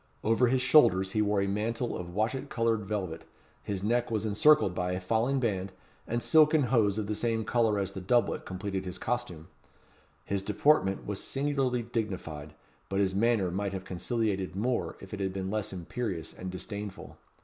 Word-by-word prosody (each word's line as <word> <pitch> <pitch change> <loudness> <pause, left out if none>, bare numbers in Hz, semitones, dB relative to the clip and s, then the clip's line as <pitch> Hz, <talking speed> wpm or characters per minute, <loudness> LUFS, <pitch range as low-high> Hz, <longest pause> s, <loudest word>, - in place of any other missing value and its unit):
Over 115 +3 +3
his 130 +1 +2
shoulders 95 -9 +5
he 110 - +1
wore 105 -1 +2
a - - -1
mantle 115 +4 -1
of 90 0 -7
watchet 110 +5 -1
coloured 115 -3 0
velvet; 95 -6 -3 0.4
his 100 -2 -4
neck 120 +3 +1
was 110 -2 -1
encircled 110 0 +4
by 90 0 -1
a 90 - -2
falling 115 +8 +1
band; 100 -6 -1 0.4
and 120 +1 -1
silken 155 -1 +5
hose 110 -5 +2
of 110 - -1
the 105 - -2
same 115 0 -1
colour 110 -2 +2
as 100 -1 -1
the 95 - -7
doublet 120 +6 +1
completed 95 0 -4
his 90 -1 -5
costume. 115 -10 -3 0.8
His 100 -1 -1
deportment 100 0 +2
was 105 -1 -3
singularly 135 -3 0
dignified; 90 -10 -4 0.3
but 95 - -1
his 95 -1 +2
manner 105 -3 +2
might 100 +2 -2
have 95 0 -5
conciliated 95 0 -2
more 120 +5 -1
if - - -11
it 105 - -4
had 95 -1 -1
been 95 0 -3
less 105 0 -2
imperious 95 -1 -4
and 95 - -6
disdainful. 100 +2 -7
105 Hz, 180 wpm, -29 LUFS, 95-120 Hz, 0.8 s, shoulders